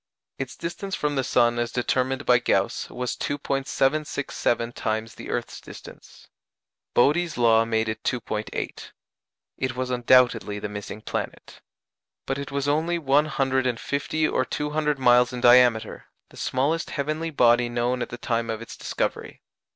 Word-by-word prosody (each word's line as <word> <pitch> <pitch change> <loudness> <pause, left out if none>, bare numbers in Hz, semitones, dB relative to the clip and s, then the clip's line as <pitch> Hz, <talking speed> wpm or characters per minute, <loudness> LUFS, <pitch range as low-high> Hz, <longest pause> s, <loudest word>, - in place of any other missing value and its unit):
Its 135 -2 -5
distance 175 +3 -4
from 150 0 -1
the 135 -2 0
sun 120 -1 +2
as 120 0 -1
determined 130 +2 -1
by 125 -1 +5
Gauss 125 - 0
was 125 0 -3
2·767 135 -3 -1
times 110 0 -3
the - - -10
earth's - - -4
distance. - - -13 0.7
Bode's 155 +6 +3
law 115 -1 +4
made 110 -1 0
it 110 - -3
2·8. 110 -3 -4 0.7
It 130 -1 -2
was 130 0 -3
undoubtedly 120 -4 +3
the 105 - -4
missing 105 +1 -7
planet. - - -6 0.6
But 135 +1 -2
it 140 - -5
was 140 0 -2
only 160 +4 +1
one 145 -1 +3
hundred 130 -3 0
and 120 -2 -1
fifty 155 +2 -1
or - - +1
two 150 +3 -3
hundred 150 -1 0
miles 125 -1 +4
in 125 - -5
diameter 120 -2 +4 0.2
the - - -16
smallest 145 +6 0
heavenly 155 +3 -2
body 120 -4 +3
known 120 +1 -1
at 120 - -3
the 120 - -7
time 115 -1 -2
of 110 -1 -2
its 115 - -9
discovery. - - -4
125 Hz, 155 wpm, -25 LUFS, 120-145 Hz, 0.7 s, by